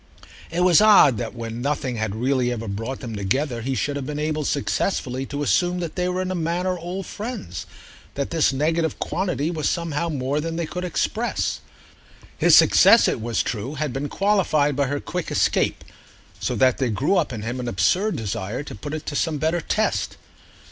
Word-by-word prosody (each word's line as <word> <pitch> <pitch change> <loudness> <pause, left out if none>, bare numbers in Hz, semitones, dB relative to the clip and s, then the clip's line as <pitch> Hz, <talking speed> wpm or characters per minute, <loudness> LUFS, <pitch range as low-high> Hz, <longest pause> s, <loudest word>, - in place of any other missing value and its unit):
It 170 +2 -1
was 180 0 +6
odd 200 - +6
that 120 0 -4
when 115 0 -5
nothing 135 -3 -1
had 110 -1 -2
really 125 +1 +1
ever 115 -2 -4
brought 115 +6 -4
them 115 -3 -6
together 120 +6 -1
he 130 +3 -2
should 145 +2 -1
have 140 -2 -4
been 150 0 -4
able 155 0 -1
successfully 135 -2 -1
to 145 +1 -3
assume 175 +5 +2
they 180 +1 -2
were 185 +1 -1
in 185 - -3
a - - -1
manner 175 +2 -1
old 180 +2 -5
friends—that 140 - -7
this 165 -4 +3
negative 160 +4 0
quantity 175 -4 -1
was 155 -3 -1
somehow 170 -1 -2
more 140 0 -1
than 165 +1 -3
they 170 0 -1
could 180 +3 -5
express. 180 - -1 0.8
His - - +5
success, - - +7
it - - -1
was 115 0 0
true, 120 +6 -4
had 150 -3 -2
been 140 +2 -3
qualified 175 -8 +2
by 140 0 +1
her 145 +2 -2
quick - - -4
escape, - - +1 0.6
so - - -2
that 130 -1 +3
there 130 -3 +1
grew 130 - +1
up 165 -6 +1
in 110 -3 -5
him 120 +3 -3
an 125 - -4
absurd 180 - +1
desire 110 +3 -3
to - - -9
put 145 +9 -6
it 155 - -6
to 145 - -4
some 160 0 0
better 160 +3 0
test. - - -1
145 Hz, 190 wpm, -23 LUFS, 125-170 Hz, 0.8 s, success